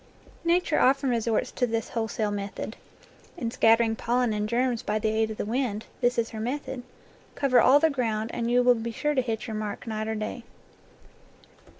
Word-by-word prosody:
Nature 340 -1 +2
often 270 0 +3
resorts 230 -2 0
to 250 - 0
this 225 -1 -2
wholesale 220 -2 -2
method. 205 +2 -5 0.6
In 235 -8 -3
scattering 225 -1 +4
pollen 240 0 0
and 210 0 -2
germs 245 0 +1
by 210 +1 -1
the 215 0 0
aid 220 0 +1
of 215 - -6
the - - -2
wind, 225 -2 -2 0.2
this 245 +1 +2
is 230 -1 0
her 220 - -6
method: 265 +2 -3 0.5
cover 270 -3 +4
all 275 +3 +6
the 320 +1 +3
ground, 225 -4 -1
and 235 0 -2
you 245 +1 +4
will 250 0 +6
be 230 0 -4
sure 295 +6 -1
to 265 - +2
hit 225 -3 -3
your 220 -3 -5
mark 215 -1 -4
night 220 -1 -3
or 220 - -2
day. 215 +3 -4
230 Hz, 195 wpm, -27 LUFS, 220-250 Hz, 0.6 s, all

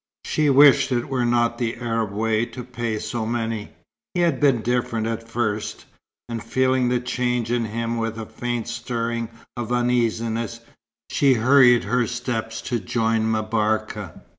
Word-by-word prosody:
She 155 -1 +1
wished 140 0 +6
it 120 0 -1
were 125 -3 0
not 120 0 +1
the 115 -2 -1
Arab 115 -3 -2
way 110 +2 +1
to 125 - -8
pay 120 -2 -3
so 115 +1 -3
many. 115 -1 -2 0.5
He 175 - +2
had 170 -1 +2
been 135 -6 +3
different 120 -2 0
at 115 0 -4
first; 110 -3 -2 0.4
and 115 -2 -5
feeling 130 -1 +2
the 125 0 +1
change 125 -1 -1
in 120 -1 +1
him 115 +2 -3
with 115 -1 -2
a 110 - -5
faint 120 0 -4
stirring 115 -1 -3 0.3
of 120 -1 -4
uneasiness, 115 -2 0 0.5
she 135 -2 +4
hurried 120 0 +5
her 125 -2 +1
steps 120 -2 -3
to 120 -2 -1
join 110 +2 0
M'Barka. 110 -4 -1
115 Hz, 155 wpm, -23 LUFS, 115-125 Hz, 0.5 s, wished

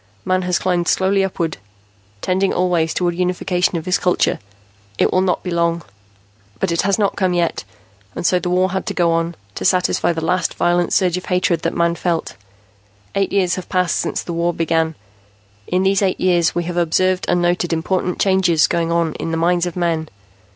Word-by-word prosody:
Man 185 0 +1
has 180 -1 0
climbed 175 -2 0
slowly 195 +1 +2
upward, 170 -4 -2 0.6
tending 190 +1 +1
always 175 -3 +1
toward 175 -1 0
unification 180 0 0
of 160 - -6
his 185 +1 +1
culture. 180 - +1 0.6
It - - +2
will 185 - +3
not 185 -1 0
be 180 - -4
long 170 -1 0 0.8
"But 190 - 0
it 170 - +1
has 200 +1 +1
not 205 -2 +1
come 185 -2 0
yet, 170 -1 0 0.5
and - - -4
so 180 - +3
the 180 - -3
war 185 +1 +2
had 190 0 -3
to - - -3
go 170 -2 +2
on, 165 +1 -1 0.2
to - - -6
satisfy 180 -2 +2
the 160 -1 -3
last 180 +1 0
violent 175 0 +1
surge 180 -2 +2
of 180 - -6
hatred 180 -2 +1
that 165 - -2
Man 170 0 +2
felt. 170 -1 -2 0.8
Eight 195 -1 0
years 185 -3 +1
have 185 - -7
passed 180 -2 +1
since - - -2
the 170 - -5
war 170 0 0
began. 165 -1 0 0.7
In 180 +1 +1
these 195 +1 +2
eight 190 -2 0
years, 175 -3 +2
we 175 - 0
have 175 +1 -5
observed 185 +2 +1
and 175 - +2
noted 175 0 0
important 180 +2 -1
changes 190 -5 +3
going 170 -1 -1
on 170 -2 +1
in - - -3
the 165 - -1
minds 175 +1 +1
of 175 - -6
men. 165 -3 -1
175 Hz, 200 wpm, -19 LUFS, 170-185 Hz, 0.8 s, will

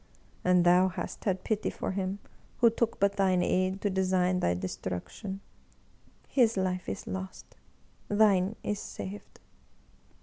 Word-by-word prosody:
And 180 -1 +4
thou 180 +2 +6
hast 185 - -6
had 190 -3 0
pity 215 -1 0
for - - -4
him 190 0 -2 0.4
who 235 -2 +5
took 230 0 -1
but 200 0 +2
thine 185 -2 +3
aid 185 +2 +1
to 205 - +1
design 185 -1 +2
thy 90 - +1
destruction. 95 - -5 0.9
His 230 -5 +3
life 185 -1 -1
is 95 - -5
lost, 95 0 -7 0.5
thine 205 -1 +3
is 205 -1 -2
saved 200 0 -8
190 Hz, 135 wpm, -29 LUFS, 180-200 Hz, 0.9 s, thou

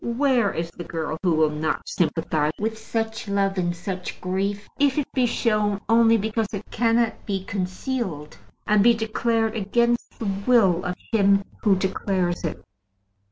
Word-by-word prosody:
Where 235 -3 +2
is 165 0 -4
the 175 - -8
girl 160 -1 -4
who 175 -4 +2
will 155 -1 +3
not 155 +1 -2
sympathize 155 -2 0
with 220 +1 -2
such 220 0 -4
love 195 -1 0
and 175 -1 0
such 180 +1 -5
grief, 200 +2 -2
if 280 -1 +3
it 295 - +1
be 255 -2 +2
shown 210 -4 +1
only 230 0 +5
because 220 +1 -1
it 205 0 -6
cannot 230 0 +1
be 195 -2 -2
concealed, 185 - -3 0.3
and 210 -1 +4
be 235 +1 +6
declared 225 0 0
against 235 +3 0
the 225 - -5 0.2
will 195 -8 +4
of 180 0 -2 0.2
him 200 -3 +4 0.2
who 205 -3 +4
declares 185 -2 -1
it? - - -4
205 Hz, 160 wpm, -24 LUFS, 180-230 Hz, 0.3 s, be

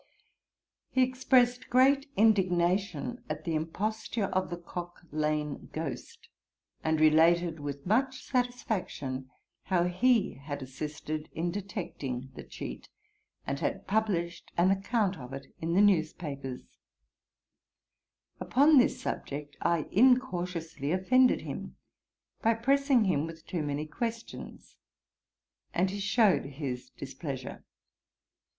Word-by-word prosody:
He 260 - +3
expressed 255 -1 +2
great 275 +3 +4
indignation 190 - +2
at 155 0 -4
the 165 - -2
imposture 210 +8 -2
of 185 0 0
the 175 - -4
Cocklane 155 -4 -4
Ghost, 155 -3 -6 0.6
and 160 0 +1
related, 160 +2 +4
with 145 -1 -6
much 255 +6 +1
satisfaction, 210 - -2 0.4
how 180 -2 +2
he 220 +6 +2
had 145 -1 -5
assisted 150 +3 -5
in 170 +2 -1
detecting 165 - -5
the - - -8
cheat, - - -8 0.6
and 140 0 -2
had 155 - -2
published 190 -5 -1
an 180 +2 +5
account 195 -1 0
of 125 0 -9
it 135 0 -9
in 165 +1 -1
the 195 - +6
news 180 -7 +4
papers. 140 -6 -7 1.6
Upon 285 +3 +5
this 250 - +2
subject 145 +1 -5
I 170 -3 +1
incautiously 180 - +2
offended 250 +8 +4
him, - - -6 0.7
by 230 0 +3
pressing 270 +1 +3
him 165 -6 +1
with 165 -1 -10
too 175 - -3
many 145 0 -2
questions, 230 +8 -6 1.0
and 185 +2 +2
he 200 - -4
shewed 205 - +3
his 135 -3 -5
displeasure. - - -7
175 Hz, 115 wpm, -30 LUFS, 155-225 Hz, 1.6 s, the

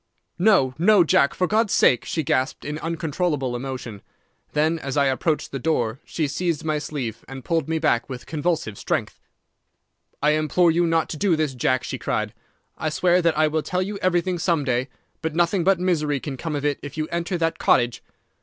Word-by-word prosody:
"'No, 180 -10 +4
no, 190 +1 +6
Jack, 140 -3 +3
for 185 - +1
God's 215 +2 +1
sake!' 125 - +4
she 160 - -2
gasped, 130 -1 -1
in 150 +1 -4
uncontrollable 160 -5 -2
emotion. 120 -5 -6 0.5
Then, 155 +2 +1
as 135 -1 -4
I 140 - +4
approached 145 +4 0
the 135 - -4
door, 125 -5 0
she 155 -3 -2
seized 165 +2 -2
my 155 -1 0
sleeve 130 -7 -5
and 135 -1 -9
pulled 165 -3 0
me 160 - +1
back 150 -7 +1
with 125 -2 -7
convulsive 155 - -2
strength. - - -2 1.0
"'I 150 - +5
implore 155 +3 +3
you 170 +1 +2
not 165 -1 +1
to 155 - -5
do 190 0 +2
this, 155 -3 -1
Jack,' 130 +1 0
she - - -5
cried. - - -2 0.5
'I 155 - 0
swear 175 +3 +2
that 165 -2 +1
I 155 0 +4
will 155 +1 0
tell 180 +4 -1
you 200 +1 -5
everything 180 0 +1
some 165 -3 +1
day, 130 -1 0 0.3
but 160 -1 -3
nothing 175 +2 +2
but 190 0 +3
misery 155 -6 0
can 140 0 -5
come 155 +3 -4
of 145 0 -3
it 145 -1 0
if 145 +2 -8
you 155 0 -1
enter 170 +1 -1
that 165 -1 -1
cottage. 120 -1 +2
155 Hz, 200 wpm, -23 LUFS, 135-170 Hz, 1.0 s, no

